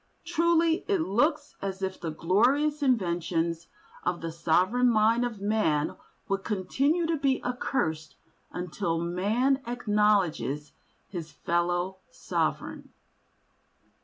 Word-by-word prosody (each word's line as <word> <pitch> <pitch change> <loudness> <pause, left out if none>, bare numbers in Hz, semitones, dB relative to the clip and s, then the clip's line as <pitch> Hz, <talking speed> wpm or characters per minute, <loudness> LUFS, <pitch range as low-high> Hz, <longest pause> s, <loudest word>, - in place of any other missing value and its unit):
Truly 335 0 +2
it 395 -5 +2
looks 295 - +1
as 195 0 -4
if 190 0 -3
the 165 - -3
glorious 250 - +2
inventions 170 - 0 0.4
of 180 -1 -1
the 165 0 -4
sovereign 180 +9 +2
mind 225 +1 +3
of 235 -4 -3
man 200 -8 +1 0.3
would 195 0 -1
continue 275 - 0
to 325 0 0
be 275 -2 +1
accursed 160 - -2 0.4
until 175 -1 -2
man 210 +11 +1
acknowledges 205 - +1 0.4
his 165 -4 -6
fellow 175 +4 -1
sovereign. - - -3
200 Hz, 105 wpm, -28 LUFS, 170-260 Hz, 0.4 s, mind